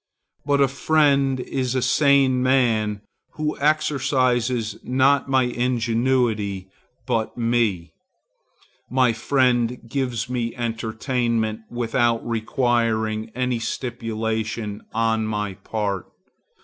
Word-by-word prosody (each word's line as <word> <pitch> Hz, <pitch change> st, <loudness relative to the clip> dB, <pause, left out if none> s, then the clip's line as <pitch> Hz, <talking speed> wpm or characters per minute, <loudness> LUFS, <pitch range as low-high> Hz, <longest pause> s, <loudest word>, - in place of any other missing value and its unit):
But 140 Hz, -1 st, +3 dB
a 140 Hz, -, +5 dB
friend 140 Hz, -1 st, +2 dB
is 130 Hz, 0 st, -2 dB
a 130 Hz, -, +1 dB
sane 135 Hz, -1 st, +3 dB
man 115 Hz, -5 st, +2 dB, 0.3 s
who 155 Hz, 0 st, -2 dB
exercises 130 Hz, -6 st, +1 dB
not 135 Hz, +2 st, +2 dB
my 130 Hz, -1 st, +3 dB
ingenuity, 120 Hz, -5 st, 0 dB, 0.3 s
but 115 Hz, -3 st, -1 dB
me. 115 Hz, -8 st, 0 dB, 1.0 s
My 125 Hz, -2 st, +3 dB
friend 125 Hz, 0 st, +1 dB
gives 125 Hz, -2 st, -2 dB
me 120 Hz, -2 st, -3 dB
entertainment 115 Hz, -1 st, -1 dB
without 120 Hz, -1 st, 0 dB
requiring 115 Hz, -2 st, 0 dB
any 125 Hz, -1 st, 0 dB
stipulation 110 Hz, -3 st, -3 dB
on 110 Hz, -1 st, 0 dB
my 105 Hz, -2 st, -2 dB
part. 100 Hz, -2 st, -3 dB
120 Hz, 95 wpm, -23 LUFS, 110-130 Hz, 1.0 s, a